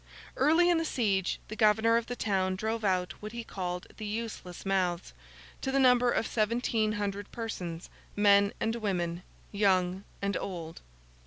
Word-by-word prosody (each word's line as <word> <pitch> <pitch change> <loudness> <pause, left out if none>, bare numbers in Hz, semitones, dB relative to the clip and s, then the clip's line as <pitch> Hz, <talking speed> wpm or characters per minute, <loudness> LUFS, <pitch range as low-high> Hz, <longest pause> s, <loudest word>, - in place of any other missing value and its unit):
Early 320 +6 +4
in 345 -2 +4
the - - 0
siege, 200 - 0
the 215 - -6
governor 220 +1 +4
of 235 0 +1
the 245 - -4
town 190 -4 0
drove 220 +3 -2
out 185 -2 +1
what 215 +1 -7
he 235 0 -5
called 180 -4 -4
the 215 - -6
useless 215 -5 -5
mouths, 180 - 0 0.5
to 265 - -1
the 275 - +1
number 250 -2 +5
of 225 - +1
seventeen 220 -1 0
hundred 205 -1 -3
persons, 180 -7 -5 0.3
men 200 -1 +5
and 225 +1 0
women, 175 -5 -2 0.3
young 190 -2 +2 0.2
and 200 0 -1
old. 165 -4 -5
205 Hz, 160 wpm, -30 LUFS, 185-230 Hz, 0.5 s, number